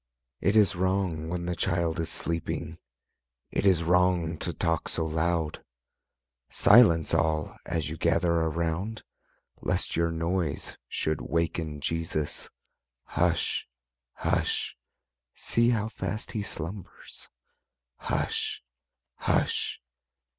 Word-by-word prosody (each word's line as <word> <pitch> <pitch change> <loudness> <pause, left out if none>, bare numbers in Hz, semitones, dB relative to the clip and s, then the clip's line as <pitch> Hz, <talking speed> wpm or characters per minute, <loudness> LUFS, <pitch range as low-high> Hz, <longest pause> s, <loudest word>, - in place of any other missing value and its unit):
It 100 +5 +2
is 105 -4 +5
wrong 90 -3 0
when 85 0 -2
the 90 0 -1
Child 85 -1 0
is 85 0 -1
sleeping, 80 0 -2 0.7
It 100 - +1
is 90 -3 +4
wrong 90 -1 +3
to - - -2
talk 85 -2 -1
so 80 - 0
loud; 80 0 -1 0.9
Silence, 85 -10 +6
all, 80 -1 +1
as 80 -2 -1
you 80 +1 -5
gather 85 +1 +2
around, 85 +6 -1 0.6
Lest - - 0
your 85 0 +2
noise 85 -1 -2
should 80 -4 -1
waken 80 +1 -1
Jesus: 80 -1 -2 0.6
Hush! - - +1 0.5
Hush! - - 0 0.6
see 115 +1 +2
how 110 -3 +1
fast 110 0 -4
He 110 - -2
slumbers; 95 0 -7 0.7
Hush! - - -2 0.5
Hush! - - 0
85 Hz, 105 wpm, -28 LUFS, 80-90 Hz, 0.9 s, Silence